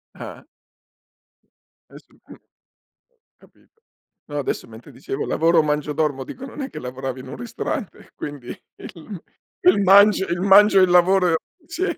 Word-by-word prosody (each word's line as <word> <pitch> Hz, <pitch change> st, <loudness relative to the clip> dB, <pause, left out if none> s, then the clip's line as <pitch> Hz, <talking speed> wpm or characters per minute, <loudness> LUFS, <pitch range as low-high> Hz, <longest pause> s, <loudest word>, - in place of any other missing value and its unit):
Eh. -, -, -10 dB, 1.5 s
Eh -, -, -13 dB
sì, -, -, -28 dB
mh. -, -, -14 dB, 1.0 s
Capito. 450 Hz, -, -27 dB, 0.5 s
No, 145 Hz, -1 st, -5 dB
adesso 140 Hz, -, -3 dB
mentre 115 Hz, +1 st, -14 dB
dicevo: 135 Hz, +1 st, -6 dB
"Lavoro, 165 Hz, 0 st, +2 dB
mangio, 150 Hz, 0 st, -2 dB
dormo" 145 Hz, -3 st, -2 dB
dico, 265 Hz, -, -10 dB
non 270 Hz, +2 st, -9 dB
è 270 Hz, -, -5 dB
che -, -, -8 dB
lavoravi 130 Hz, +1 st, -6 dB
in 130 Hz, -, -11 dB
un -, -, -8 dB
ristorante. 230 Hz, -, -6 dB
Quindi, 145 Hz, -4 st, -8 dB, 0.3 s
il 175 Hz, +1 st, -11 dB, 0.4 s
il 185 Hz, +3 st, +5 dB
mangio 200 Hz, +1 st, +5 dB
il 175 Hz, +1 st, -3 dB
mangio 195 Hz, +1 st, +6 dB
e -, -, +6 dB
il 180 Hz, -, +3 dB
lavoro 180 Hz, -1 st, +4 dB, 0.3 s
sì. 330 Hz, +4 st, -4 dB
175 Hz, 150 wpm, -21 LUFS, 145-200 Hz, 1.5 s, mangio